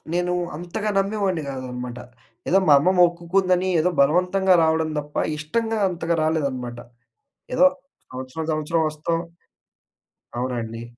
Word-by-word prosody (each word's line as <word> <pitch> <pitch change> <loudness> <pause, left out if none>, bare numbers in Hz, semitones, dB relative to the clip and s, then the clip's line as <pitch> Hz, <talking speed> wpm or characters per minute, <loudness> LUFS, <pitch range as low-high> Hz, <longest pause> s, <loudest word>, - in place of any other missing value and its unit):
నేనూ 180 +1 0 0.2
అంతగా 175 +5 -3
నమ్మేవోని 195 -4 0
కాదనమాట. 125 -2 -6 0.5
ఏదో 190 - +5
మా 145 - +8
అమ్మ 165 +6 +2
మొక్కుకుందని, 180 +2 +2
ఏదో 180 +3 +2
బలవంతంగా 180 +6 +3
రావడం 160 0 +1
తప్ప, 150 0 -7 0.2
ఇష్టంగా 225 +9 -2
అంతగా 170 -1 -2
రాలేదనమాట. 135 -6 -2 0.8
ఏదో 265 +2 +5 0.5
సంవత్సరం, 130 +5 -6
సంవత్సరం 155 +1 0
వస్తాం. 155 +2 -2 1.2
అవునండి. 115 -2 -3
160 Hz, 110 wpm, -23 LUFS, 140-180 Hz, 1.2 s, మా